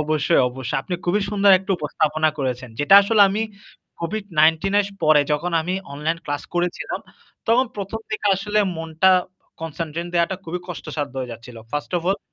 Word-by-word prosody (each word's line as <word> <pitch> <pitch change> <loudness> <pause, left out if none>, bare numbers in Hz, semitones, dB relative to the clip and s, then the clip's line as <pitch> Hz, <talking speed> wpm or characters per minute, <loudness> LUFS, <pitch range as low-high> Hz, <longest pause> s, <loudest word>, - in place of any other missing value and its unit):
অবশ্যই, 155 +2 +2
অবশ্যই। 130 +2 -3
আপনি 180 - -4
খুবই 190 +4 +1
সুন্দর 200 -1 +4
একটা 190 +2 -9
উপস্থাপনা 155 +1 +1
করেছেন। 130 -2 -3
যেটা 145 +7 +5
আসলে 210 +1 +2
আমি 205 +3 -1 0.6
COVID-19 170 -2 +1
এর 200 - -1 0.2
পরে 155 -1 +6
যখন 170 +4 -1
আমি 180 +3 -2 0.2
অনলাইন 155 +4 -2
ক্লাস 145 0 -3
করেছিলাম 175 0 -2 0.5
তখন 250 +3 +4
১ম 200 +3 -4
দিকে 215 -1 -2
আসলে 205 +2 -1 0.2
মন 165 0 -6 0.7
কনসেনট্রেট 165 +1 -4
দেওয়াটা 170 +2 +1
খুবই 175 +2 -4
কষ্টসাধ্য 150 -5 -5
হয়ে 125 -2 -4
যাচ্ছিল। 115 +1 -11 0.2
first 145 +3 -3
of - - -8
all 195 - +1
165 Hz, 160 wpm, -22 LUFS, 150-195 Hz, 0.7 s, পরে